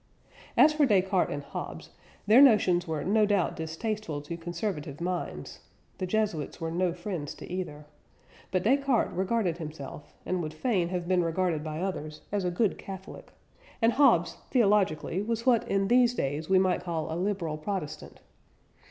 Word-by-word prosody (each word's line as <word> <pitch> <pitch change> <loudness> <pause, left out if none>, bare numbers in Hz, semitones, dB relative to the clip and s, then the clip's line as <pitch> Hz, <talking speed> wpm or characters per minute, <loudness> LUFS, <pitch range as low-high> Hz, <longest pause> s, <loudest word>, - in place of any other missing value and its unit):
As 305 +1 +7
for 300 -2 +3
Descartes 190 -3 +2
and 145 - -4
Hobbes, - - -7 0.3
their 220 +6 +7
notions 190 -9 +5
were 160 -2 -2
no 210 +2 +3
doubt 200 -4 +1
distasteful 165 +1 -3
to 170 +3 -5
conservative 170 -3 -4
minds 180 +1 -4 0.4
(the 185 - -2
Jesuits 200 -7 -1
were 165 0 -3
no 180 +1 +1
friends 175 -4 -5
to - - -10
either), 170 -5 -5 0.6
but 185 -1 0
Descartes 270 +1 +2
regarded 190 -2 0
himself, 150 -2 -8
and 185 -1 -1
would 155 -1 -5
fain 180 -2 0
have 175 -1 -3
been 180 -1 +3
regarded 165 -2 0
by 155 +1 -4
others, 155 -5 -4
as 205 -1 0
a 180 - +1
good 195 +4 0
Catholic; 190 -1 -9 0.5
and 230 0 +3
Hobbes, 240 - +4
theologically, 200 - +2
was 230 +2 -2
what 245 -3 +3
in 195 0 +1
these 245 +1 +4
days 145 - -2
we 190 - +5
might 185 -1 +2
call 165 -3 -3
a - - -2
Liberal 175 -4 -2
Protestant. 180 -3 -5
185 Hz, 160 wpm, -28 LUFS, 160-210 Hz, 0.6 s, As